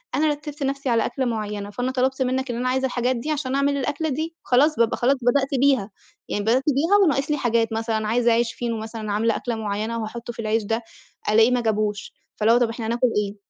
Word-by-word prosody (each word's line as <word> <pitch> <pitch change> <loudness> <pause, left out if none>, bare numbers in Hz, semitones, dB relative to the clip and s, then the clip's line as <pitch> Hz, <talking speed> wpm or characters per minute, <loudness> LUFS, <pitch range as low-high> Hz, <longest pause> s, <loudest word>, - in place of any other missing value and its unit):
أنا 310 +1 +2
رتّبت 295 0 -4
نفْسي 275 -1 -2
على 230 -2 +2
أكْلة 265 - -2
معيّنة، 210 -3 -3
فأنا 245 +5 -2
طلبت 265 +1 0
منك 260 0 0
إن 235 - -4
أنا 255 +1 -1
عايزة 265 +1 +1
الحاجات 250 0 0
دي 295 +7 -3
عشان 270 -3 -2
أعمل 280 0 +1
الأكلة 295 +4 -2
دي، 320 +4 -3
خلاص، 290 +5 +3
بابقى 230 -2 +2
خلاص 265 +3 +3
بدأت 265 +3 +2
بيها، 260 -7 +2 0.4
يعني 205 - -1
بدأت 245 +5 +2
بيها 315 +7 +3
وناقص 295 -2 +1
لي 295 - +1
حاجات، 230 -3 +1
مثلًا 220 -1 -1
عايزة 235 +1 +2
عيش 230 0 +1
فينو، 235 -2 -3
مثلًا 220 -1 -5
عاملة 225 +2 +1
أكْلة 240 -2 -3
معيّنة 215 +1 -3
وهاحطه 235 +2 -6
في 235 - -16
العيش 220 0 0
ده، 225 +3 -2 0.5
ألاقيه 225 +3 +5
ما 250 - +2
جابوش، 215 -2 -1 0.2
فاللي 220 +2 +3
هو 240 - +5
طَب 240 -2 +2
إحنا 225 -1 -5
هناكل 240 +2 +2
إيه، 205 0 -1
240 Hz, 220 wpm, -23 LUFS, 225-270 Hz, 0.5 s, ألاقيه